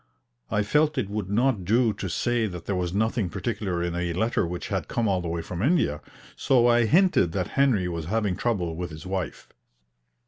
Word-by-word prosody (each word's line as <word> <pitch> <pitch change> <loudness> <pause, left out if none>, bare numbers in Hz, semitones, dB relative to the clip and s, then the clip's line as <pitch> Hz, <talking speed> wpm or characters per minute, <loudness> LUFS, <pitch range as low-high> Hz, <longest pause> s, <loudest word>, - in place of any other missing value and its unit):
I 105 - +1
felt 150 +8 +2
it 105 -6 -1
would 105 -3 -3
not 115 -1 +1
do 115 +4 +2
to 100 -1 -5
say 120 +6 0
that 90 -3 -8
there 100 - -1
was 90 -1 -1
nothing 110 0 0
particular 95 -2 -2
in 85 -1 -2
a 85 0 -2
letter 110 0 0
which 90 +1 -5
had - - -2
come 115 -2 -1
all 95 -2 +1
the 85 - -4
way 85 0 -3
from 90 -1 -5
India, 130 - +1 0.3
so 125 -3 +3
I 120 -1 +4
hinted 165 - +3
that 90 -3 -2
Henry 125 -10 +2
was 85 -3 -4
having 105 0 0
trouble 90 -9 -1
with 90 +1 -4
his 75 +1 -10
wife. 95 -1 -4
100 Hz, 205 wpm, -26 LUFS, 90-120 Hz, 0.3 s, I